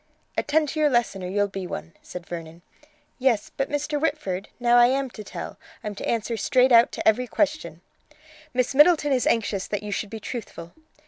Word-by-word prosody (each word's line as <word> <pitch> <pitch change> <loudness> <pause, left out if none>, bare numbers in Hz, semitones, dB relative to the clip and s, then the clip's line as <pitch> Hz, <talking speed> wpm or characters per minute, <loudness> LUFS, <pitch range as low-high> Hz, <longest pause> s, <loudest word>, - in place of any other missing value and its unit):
"Attend 305 +1 +1
to 310 - -4
your 300 -1 +4
lesson, 240 -7 0
or - - -3
you'll 205 +2 +1
be 195 -2 -6
one," 80 - -7
said 180 -1 -9
Vernon. 165 0 -8 0.6
"Yes, 245 -5 +1
but, 270 - -1
Mr. 295 0 -2
Whitford, 200 - -2
now 240 0 +4
I 240 0 +7
am 265 0 0
to 215 - -9
tell. - - -8 0.2
I'm 210 - -4
to 200 - -5
answer 230 0 -1
straight 255 +3 +3
out 235 0 +6
to - - -3
every 245 +3 +3
question." 305 +5 -1 0.7
"Miss 250 +1 0
Middleton 295 0 +5
is 255 - +1
anxious 205 -4 0
that 205 -1 -3
you 210 - -5
should 205 - -3
be 220 - -7
truthful." 195 -8 -7
235 Hz, 195 wpm, -24 LUFS, 200-275 Hz, 0.7 s, I